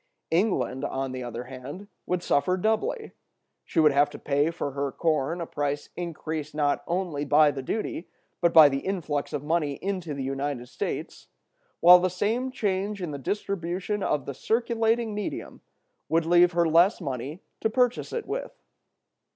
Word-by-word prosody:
England, 160 Hz, -, +1 dB
on 135 Hz, -2 st, -2 dB
the 130 Hz, 0 st, -5 dB
other 120 Hz, 0 st, -5 dB
hand, 130 Hz, +10 st, -9 dB, 0.2 s
would 180 Hz, -1 st, -1 dB
suffer 180 Hz, +5 st, +2 dB
doubly: 220 Hz, -, -1 dB, 0.5 s
she -, -, -1 dB
would 155 Hz, -2 st, +6 dB
have 145 Hz, +1 st, +3 dB
to -, -, -9 dB
pay 145 Hz, +2 st, +1 dB
for 165 Hz, -4 st, -4 dB
her 140 Hz, 0 st, -2 dB
corn 160 Hz, +1 st, 0 dB
a 170 Hz, -, -3 dB
price 145 Hz, -1 st, -3 dB
increased 160 Hz, -3 st, -5 dB
not 145 Hz, -1 st, +1 dB
only 170 Hz, -5 st, -1 dB
by 150 Hz, +1 st, +5 dB
the 135 Hz, -1 st, -5 dB
duty, 185 Hz, +3 st, -4 dB, 0.3 s
but 170 Hz, -1 st, +4 dB
by 160 Hz, -3 st, +9 dB
the 135 Hz, -1 st, 0 dB
influx 155 Hz, -5 st, -2 dB
of 145 Hz, -2 st, -3 dB
money 150 Hz, -2 st, 0 dB
into 180 Hz, -1 st, -4 dB
the 135 Hz, -, -4 dB
United 135 Hz, -2 st, -3 dB
States, -, -, -5 dB, 0.5 s
while 180 Hz, +1 st, +9 dB
the 185 Hz, +1 st, +1 dB
same 220 Hz, +8 st, -1 dB
change 200 Hz, -3 st, -1 dB
in 175 Hz, -4 st, -4 dB
the 140 Hz, -, -5 dB
distribution 195 Hz, +4 st, -2 dB
of 145 Hz, -7 st, 0 dB
the 140 Hz, -, -4 dB
circulating 225 Hz, -, 0 dB
medium 210 Hz, 0 st, -5 dB, 0.5 s
would 165 Hz, 0 st, +2 dB
leave 175 Hz, +1 st, +5 dB
her 170 Hz, -1 st, +3 dB
less 170 Hz, +6 st, +4 dB
money 140 Hz, -, -5 dB, 0.2 s
to 220 Hz, -, +1 dB
purchase 245 Hz, +1 st, +1 dB
it 470 Hz, -3 st, -3 dB
with. -, -, -5 dB
165 Hz, 165 wpm, -26 LUFS, 145-195 Hz, 0.5 s, by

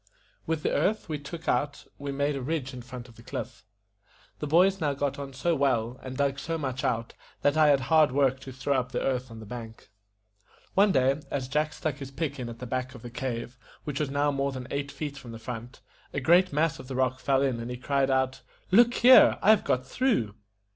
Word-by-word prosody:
With 160 Hz, -2 st, -1 dB
the -, -, +1 dB
earth 195 Hz, +9 st, +1 dB
we 150 Hz, -2 st, -2 dB
took 160 Hz, +3 st, -9 dB
out 140 Hz, +3 st, 0 dB
we 140 Hz, 0 st, -4 dB
made 140 Hz, +1 st, 0 dB
a 135 Hz, -, -3 dB
ridge 135 Hz, -1 st, -3 dB
in 125 Hz, -, -7 dB
front 125 Hz, 0 st, -9 dB
of 115 Hz, -, -17 dB
the -, -, -13 dB
cliff. -, -, -6 dB, 0.8 s
The 150 Hz, -, -3 dB
boys 185 Hz, +5 st, +4 dB
now 145 Hz, -2 st, +1 dB
got 140 Hz, 0 st, -2 dB
on 140 Hz, -1 st, -6 dB
so 135 Hz, +6 st, 0 dB
well, 125 Hz, -4 st, 0 dB
and 130 Hz, 0 st, -7 dB
dug 140 Hz, -1 st, 0 dB
so 165 Hz, +3 st, -3 dB
much 130 Hz, -4 st, -3 dB
out, 115 Hz, 0 st, -1 dB, 0.3 s
that 145 Hz, +1 st, +3 dB
I 155 Hz, -1 st, +5 dB
had 140 Hz, -2 st, +4 dB
hard 155 Hz, +1 st, +4 dB
work 135 Hz, -1 st, +2 dB
to 135 Hz, 0 st, -9 dB
throw 130 Hz, +2 st, -1 dB
up 125 Hz, 0 st, -5 dB
the -, -, -1 dB
earth 130 Hz, -1 st, -1 dB
on 115 Hz, -1 st, -10 dB
the 110 Hz, -, -9 dB
bank. 115 Hz, -1 st, -9 dB, 0.8 s
One 200 Hz, +1 st, +5 dB
day, 135 Hz, 0 st, +2 dB
as 135 Hz, -2 st, -2 dB
Jack 150 Hz, +3 st, 0 dB
stuck 150 Hz, -4 st, -3 dB
his 135 Hz, -2 st, -7 dB
pick 140 Hz, 0 st, -3 dB
in 120 Hz, -2 st, -4 dB
at 115 Hz, -, -8 dB
the 125 Hz, -, -7 dB
back 130 Hz, +1 st, -3 dB
of 115 Hz, -, -12 dB
the 120 Hz, -, -8 dB
cave, 120 Hz, -1 st, -4 dB, 0.2 s
which 145 Hz, -2 st, -4 dB
was 150 Hz, -3 st, 0 dB
now 145 Hz, +1 st, +1 dB
more 140 Hz, 0 st, -1 dB
than 130 Hz, -2 st, -6 dB
eight 140 Hz, 0 st, -2 dB
feet 145 Hz, -2 st, -5 dB
from 120 Hz, -4 st, -10 dB
the -, -, -7 dB
front, 120 Hz, +2 st, -8 dB, 0.3 s
a -, -, +1 dB
great 175 Hz, +7 st, +4 dB
mass 155 Hz, +2 st, +1 dB
of -, -, -10 dB
the 130 Hz, -, -5 dB
rock 130 Hz, 0 st, +1 dB
fell 135 Hz, 0 st, +2 dB
in, 130 Hz, -4 st, 0 dB
and 115 Hz, +1 st, -5 dB
he 125 Hz, -, -4 dB
cried 140 Hz, +1 st, +1 dB
out, 130 Hz, 0 st, +1 dB, 0.3 s
"Look 240 Hz, +5 st, +6 dB
here! 255 Hz, +2 st, +7 dB
I 215 Hz, -, +5 dB
have 220 Hz, -, +4 dB
got 125 Hz, 0 st, 0 dB
through." 135 Hz, -, 0 dB
135 Hz, 235 wpm, -28 LUFS, 125-150 Hz, 0.8 s, here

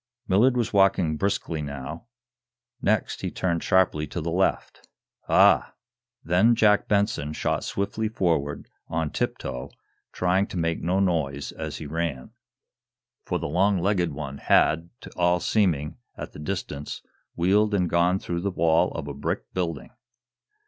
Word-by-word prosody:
Millard 120 Hz, +7 st, +4 dB
was 120 Hz, -3 st, -1 dB
walking 95 Hz, -5 st, +3 dB
briskly, 85 Hz, -3 st, -1 dB
now. 70 Hz, -, -7 dB, 0.7 s
Next, 105 Hz, -1 st, 0 dB
he -, -, -2 dB
turned 85 Hz, -3 st, -1 dB
sharply 95 Hz, -5 st, +2 dB
to -, -, -5 dB
the 85 Hz, +1 st, -3 dB
left. 95 Hz, +3 st, -1 dB, 0.4 s
"Ah!" -, -, +5 dB, 0.5 s
Then 95 Hz, +8 st, +4 dB
Jack 105 Hz, -2 st, +3 dB
Benson 100 Hz, -8 st, 0 dB
shot -, -, -1 dB
swiftly 110 Hz, +2 st, -2 dB
forward 80 Hz, -9 st, -1 dB, 0.2 s
on 80 Hz, -2 st, -2 dB
tip -, -, -1 dB
toe, 60 Hz, 0 st, -6 dB, 0.4 s
trying 95 Hz, +2 st, +1 dB
to -, -, -6 dB
make 85 Hz, -1 st, -1 dB
no 90 Hz, +3 st, +1 dB
noise 75 Hz, -7 st, 0 dB
as -, -, -6 dB
he -, -, -7 dB
ran. 75 Hz, -4 st, -3 dB, 0.9 s
For -, -, -1 dB
the -, -, -5 dB
long 95 Hz, +6 st, +2 dB
legged 90 Hz, -2 st, +1 dB
one 70 Hz, -1 st, -6 dB
had, 80 Hz, +2 st, +3 dB
to -, -, -11 dB
all 90 Hz, 0 st, +2 dB
seeming, 85 Hz, -, 0 dB, 0.2 s
at -, -, -7 dB
the -, -, -11 dB
distance, 75 Hz, -4 st, -5 dB, 0.3 s
wheeled 100 Hz, +4 st, +2 dB
and 90 Hz, -3 st, +1 dB
gone 85 Hz, +2 st, +2 dB
through 85 Hz, -2 st, -4 dB
the 100 Hz, -, -1 dB
wall 85 Hz, -1 st, +2 dB
of 80 Hz, -3 st, -5 dB
a 70 Hz, -, -4 dB
brick 70 Hz, +1 st, -4 dB
building. 85 Hz, -5 st, -3 dB
85 Hz, 150 wpm, -25 LUFS, 75-95 Hz, 0.9 s, Ah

